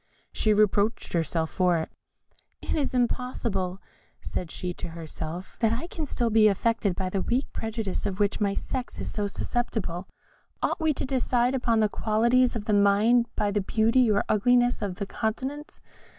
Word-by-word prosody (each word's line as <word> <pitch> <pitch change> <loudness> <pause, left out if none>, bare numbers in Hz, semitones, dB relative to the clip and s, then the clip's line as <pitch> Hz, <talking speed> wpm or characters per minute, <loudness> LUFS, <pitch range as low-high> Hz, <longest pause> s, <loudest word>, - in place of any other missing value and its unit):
She 215 - +2
reproached 210 +1 +2
herself 165 -1 0
for 180 -2 +2
it. 160 - -4 0.7
"Is 280 -4 -1
it 245 -1 +4
possible," 195 -7 -3 0.4
said 175 - -5
she 180 +1 -4
to - - -6
herself, 165 +2 -7
"that 225 -1 +3
I 250 +8 -3
can 330 -2 -5
be - - -13
still 235 -4 -1
affected 205 -1 0
by 185 0 -2
the 195 - 0
weak 250 +7 -1
prejudice 220 -3 -3
of 195 0 -4
which 205 +1 +1
my 200 -1 +1
sex 255 -1 -4
is - - -4
so 205 -1 -1
susceptible? 200 -5 -3 0.6
Ought - - 0
we 315 -1 +3
to - - -2
decide 255 -1 +1
upon 235 -4 +2
the 215 - +4
qualities 235 +5 +2
of 215 -3 -4
the 215 - +1
mind 205 +4 +4
by 205 -1 0
the 205 0 +1
beauty 225 +4 +3
or 205 -1 +3
ugliness 245 +3 +3
of 200 -3 -2
the 200 +1 -4
countenance? 265 +9 -4
215 Hz, 175 wpm, -27 LUFS, 195-245 Hz, 0.7 s, it